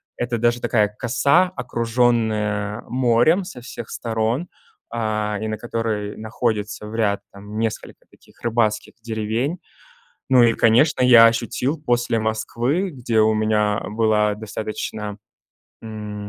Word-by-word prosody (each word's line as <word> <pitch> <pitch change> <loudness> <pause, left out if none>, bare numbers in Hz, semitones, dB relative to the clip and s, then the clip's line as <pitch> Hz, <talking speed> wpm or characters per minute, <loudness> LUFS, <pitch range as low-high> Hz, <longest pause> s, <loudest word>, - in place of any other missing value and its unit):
это 120 -1 -2
даже 120 +1 +1
такая 105 -3 +2
коса, 140 +9 +2
окруженная 115 -3 0
морем 125 +8 +3
со 180 -8 -9
всех 120 -1 -8
сторон, 115 +7 -2 0.4
а, 105 -2 -2
и 110 - -2
на 110 0 -3
которой 110 -3 -3
находится 110 -2 -3
в 110 - -8
ряд, 105 -3 +1
там, 105 +2 -9
несколько 115 -1 -4
таких - - -23
рыбацких 110 -2 0
деревень. 115 +7 -2 0.7
Ну 125 -2 +7
и, 115 -1 +4
конечно, 125 +8 +3
я 120 -2 +8
ощутил 120 +6 0
после 120 -4 +1
Москвы, 120 - -1
где 120 -5 -1
у 110 0 +4
меня 105 -1 +1
была 105 -1 +2
достаточно, 105 -1 -5 0.7
м, 105 -2 -7
115 Hz, 125 wpm, -21 LUFS, 105-120 Hz, 0.7 s, я